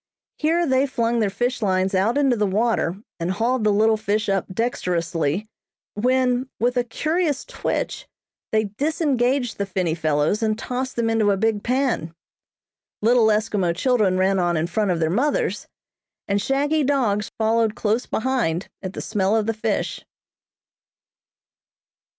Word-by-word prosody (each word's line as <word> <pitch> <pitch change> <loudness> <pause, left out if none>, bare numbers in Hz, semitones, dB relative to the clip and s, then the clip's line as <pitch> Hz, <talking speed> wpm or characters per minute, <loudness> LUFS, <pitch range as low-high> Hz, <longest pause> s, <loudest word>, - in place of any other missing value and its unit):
Here 330 +3 +2
they 265 -1 +2
flung 235 -2 0
their 215 -3 +2
fish 245 +5 -2
lines 190 -2 +1
out 200 +7 +2
into 275 -4 +3
the 210 -2 +1
water 210 -3 +1 0.2
and 170 +1 -2
hauled 230 +5 0
the 210 - +3
little 220 +2 +3
fish 210 0 -1
up 195 -2 0
dexterously; 175 -5 -1 0.5
when, 255 +3 +1
with 245 +2 +1
a 245 - +2
curious 310 +4 -1
twitch - - -3 0.4
they 220 0 +2
disengaged 260 - 0
the 200 - 0
finny 180 -4 -1
fellows 155 +4 0
and 215 -1 +1
tossed 255 +3 -4
them 235 -1 0
into 225 -2 +2
a 200 - +2
big 220 0 +1
pan. 245 - -1 0.9
Little 235 0 +5
Eskimo 210 -5 +1
children 210 -3 +2
ran 190 +1 +2
on 175 -2 +1
in 155 - 0
front 200 +4 -1
of 175 -2 0
their 160 -1 +1
mothers, 275 +10 0 0.6
and 200 0 +1
shaggy 290 +6 +1
dogs 235 -8 +1
followed 225 0 +1
close 220 +3 0
behind 220 -8 -1
at 190 -1 -5
the - - -5
smell 205 -1 0
of 220 -2 +1
the 225 - 0
fish. 215 - -2
220 Hz, 150 wpm, -22 LUFS, 195-250 Hz, 0.9 s, Little